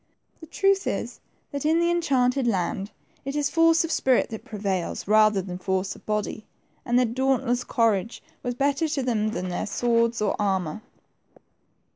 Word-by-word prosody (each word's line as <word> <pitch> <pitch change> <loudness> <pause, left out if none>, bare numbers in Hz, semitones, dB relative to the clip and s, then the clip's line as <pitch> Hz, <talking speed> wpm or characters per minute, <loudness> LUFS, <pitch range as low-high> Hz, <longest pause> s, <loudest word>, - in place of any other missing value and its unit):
The 320 - -11
truth 390 +4 +1
is, - - -3 0.3
that 280 -1 -4
in 320 +2 +3
the 340 0 +2
enchanted 270 -6 +1
land, 195 -1 -1 0.3
it 275 +1 -4
is 290 -1 0
force 330 0 +4
of 330 - -3
spirit 260 -6 +2
that 220 - -6
prevails, 195 -5 -3
rather 215 -2 +4
than 180 -1 -6
force 190 0 -1
of - - -18
body, 210 0 -2 0.4
and 240 0 +1
their 250 - +4
dauntless 245 0 0
courage 225 -2 0 0.2
was 245 -1 -3
better 280 +4 +1
to 280 -3 -1
them 220 -4 0
than 185 -4 -4
their 175 - -3
swords 235 +1 +1
or 210 -2 0
armor. 190 -1 -1
235 Hz, 165 wpm, -25 LUFS, 205-280 Hz, 0.4 s, force